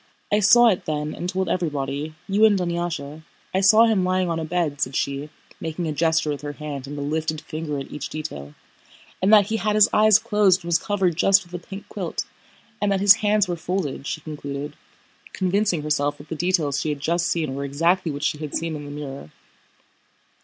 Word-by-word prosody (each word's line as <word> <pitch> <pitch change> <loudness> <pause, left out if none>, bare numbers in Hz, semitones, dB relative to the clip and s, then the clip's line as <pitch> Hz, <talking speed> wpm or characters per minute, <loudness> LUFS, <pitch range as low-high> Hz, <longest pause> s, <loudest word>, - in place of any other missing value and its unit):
"I 210 - +4
saw 230 +4 +6
it 185 - -1
then 150 0 -2
and 175 - -4
told 185 0 -1
everybody, 150 -3 -2
you 200 +2 +2
and 210 -2 +4
Dunyásha. 170 -4 -3 0.3
I 190 - +2
saw 215 +4 +7
him 215 -5 +2
lying 185 -1 +1
on 165 - -1
a 160 - -3
bed," 155 -4 -2
said 130 +1 -1
she, 140 +2 -2 0.3
making 165 +1 -4
a - - -1
gesture 160 0 +1
with 145 -2 -5
her 145 0 -5
hand 145 -3 -6
and 145 +1 -7
a 145 - -3
lifted 155 +1 -2
finger 155 -1 -5
at 135 - -7
each 150 -2 -5
detail, 75 - -7 0.7
"and 190 +3 +3
that 210 -2 +7
he 225 - 0
had 210 +1 0
his 215 0 +6
eyes 215 -1 +6
closed 210 -5 +2
and 170 - -7
was 170 - +3
covered 190 -5 0
just 195 +2 +4
with 175 - -20
a 175 -1 -6
pink 195 +3 -9
quilt, - - -4 0.6
and 205 -1 +1
that 195 - +1
his 200 +2 +7
hands 210 -2 +2
were 175 - -2
folded," 165 -5 -3
she 155 - -4
concluded, 145 -1 -6 0.6
convincing 190 -3 0
herself 145 -1 0
that 145 +1 -14
the 160 - -3
details 160 -5 0
she 155 - -2
had 145 -1 -3
just 170 +4 0
seen 155 -5 -1
were 140 +1 -4
exactly 165 +5 +1
what 145 +1 -6
she 150 - 0
had 150 -2 -5
seen 165 -1 -2
in 145 -1 -7
the - - -8
mirror. 140 - -7
165 Hz, 215 wpm, -23 LUFS, 145-190 Hz, 0.7 s, saw